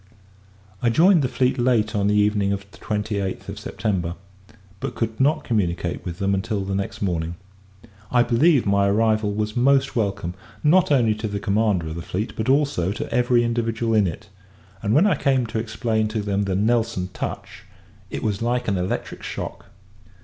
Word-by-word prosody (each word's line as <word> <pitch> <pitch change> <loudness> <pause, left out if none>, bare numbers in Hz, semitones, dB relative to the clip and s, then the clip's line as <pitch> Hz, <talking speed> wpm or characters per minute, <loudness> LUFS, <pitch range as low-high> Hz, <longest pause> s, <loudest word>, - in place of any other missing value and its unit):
I 120 - +3
joined 170 - +5
the 130 - +1
fleet 125 0 0
late 115 -3 +2
on 100 -1 +1
the 105 - +2
evening 105 -1 +2
of 100 0 -3
the - - -16
28th 105 -2 -3
of - - -6
September, 90 -5 -2 0.6
but - - -4
could 110 -1 -3
not 145 +4 +2
communicate 95 -8 -1
with 85 -1 -5
them 100 +1 0
until 100 +1 -1
the 95 - -3
next 100 +1 -3
morning. 85 -3 -1 0.7
I 120 -1 +4
believe, 130 +4 +3
my 100 0 +3
arrival 110 0 +2
was 105 +1 -2
most 135 +2 +3
welcome; 100 -6 -1 0.3
not 175 +3 +4
only 120 -6 +4
to 110 +1 -4
the 100 -1 -3
commander 100 -3 +1
of - - -5
the 85 - -5
fleet, 100 +6 -4
but 110 +2 -2
also 135 - +2
to - - -5
every 125 -1 +3
individual 115 -1 -1
in 105 -3 +4
it: 85 - -6 0.5
and, 105 +3 +1
when 170 - +5
I 210 - +4
came 130 -3 +1
to 110 0 -3
explain 110 -1 -1
to 110 0 -2
them 100 0 0
the 95 -1 -1
Nelson 105 -3 +1
touch, - - -6 0.4
it - - -5
was 105 -1 -1
like 120 +1 0
an 100 -3 +1
electric 90 +1 -3
shock. - - -6
110 Hz, 185 wpm, -23 LUFS, 100-120 Hz, 0.7 s, joined